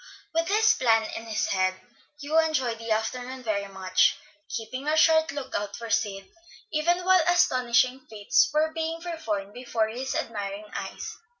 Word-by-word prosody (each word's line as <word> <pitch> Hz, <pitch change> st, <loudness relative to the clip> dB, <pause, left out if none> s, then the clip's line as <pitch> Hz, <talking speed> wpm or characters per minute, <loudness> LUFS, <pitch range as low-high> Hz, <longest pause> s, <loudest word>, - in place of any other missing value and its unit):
With 330 Hz, +1 st, +1 dB
this 430 Hz, +3 st, +4 dB
plan 225 Hz, -3 st, +3 dB
in 225 Hz, -, -7 dB
his 220 Hz, -, -1 dB
head, 185 Hz, 0 st, +1 dB, 0.4 s
Hugh 300 Hz, +3 st, +2 dB
enjoyed 265 Hz, -8 st, 0 dB
the 230 Hz, 0 st, -7 dB
afternoon 250 Hz, +4 st, -2 dB
very 200 Hz, -3 st, -1 dB
much; 190 Hz, -1 st, +2 dB, 0.3 s
keeping 255 Hz, +5 st, -5 dB
a 310 Hz, +1 st, +2 dB
sharp 320 Hz, 0 st, +5 dB
lookout 260 Hz, -8 st, -4 dB
for 230 Hz, -1 st, -7 dB
Sid, 195 Hz, -2 st, -1 dB, 0.5 s
even 345 Hz, +4 st, +1 dB
while 370 Hz, -2 st, +5 dB
astonishing 255 Hz, -6 st, +2 dB
feats 210 Hz, -2 st, +2 dB
were 310 Hz, +1 st, +2 dB
being 325 Hz, 0 st, -3 dB
performed 220 Hz, -, -4 dB
before 235 Hz, -3 st, -1 dB
his 255 Hz, +4 st, -4 dB
admiring 205 Hz, -2 st, -4 dB
eyes. -, -, -6 dB
250 Hz, 155 wpm, -26 LUFS, 215-315 Hz, 0.5 s, sharp